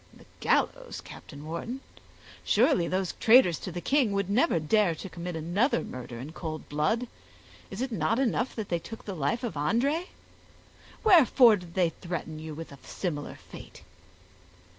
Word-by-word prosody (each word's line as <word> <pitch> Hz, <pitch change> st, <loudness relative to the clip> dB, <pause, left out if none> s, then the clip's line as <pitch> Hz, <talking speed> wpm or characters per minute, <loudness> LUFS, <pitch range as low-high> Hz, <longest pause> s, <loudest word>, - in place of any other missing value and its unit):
"The -, -, -18 dB
gallows, -, -, 0 dB
Captain 145 Hz, 0 st, -11 dB
Wharton! 170 Hz, +11 st, -5 dB, 0.6 s
surely 220 Hz, -, +3 dB
those 185 Hz, 0 st, -1 dB
traitors 225 Hz, -, +6 dB
to 185 Hz, -, -6 dB
the 175 Hz, +1 st, -5 dB
king 260 Hz, -, +2 dB
would 200 Hz, -1 st, -1 dB
never 245 Hz, -, +3 dB
dare 170 Hz, +3 st, +2 dB
to 190 Hz, -, -8 dB
commit 175 Hz, 0 st, -6 dB
another 175 Hz, -, +1 dB
murder 125 Hz, -1 st, -7 dB
in 135 Hz, +6 st, -7 dB
cold 160 Hz, -2 st, -6 dB
blood; 155 Hz, +12 st, 0 dB, 0.6 s
is 200 Hz, +6 st, -4 dB
it 260 Hz, -, -3 dB
not 225 Hz, +1 st, +1 dB
enough 255 Hz, -1 st, 0 dB
that 220 Hz, -3 st, -5 dB
they 170 Hz, -, 0 dB
took 225 Hz, +6 st, -10 dB
the 200 Hz, -, -4 dB
life 175 Hz, -, -1 dB
of 235 Hz, -, -2 dB
André? 245 Hz, -, 0 dB, 1.0 s
Wherefore 270 Hz, -, +7 dB
did 175 Hz, -2 st, -12 dB
they 180 Hz, -3 st, +3 dB
threaten 165 Hz, -2 st, -6 dB
you 155 Hz, -1 st, -7 dB
with 165 Hz, 0 st, -8 dB
a 140 Hz, -, -12 dB
similar 150 Hz, -6 st, -4 dB
fate?" -, -, -13 dB
185 Hz, 160 wpm, -28 LUFS, 160-235 Hz, 1.0 s, Wherefore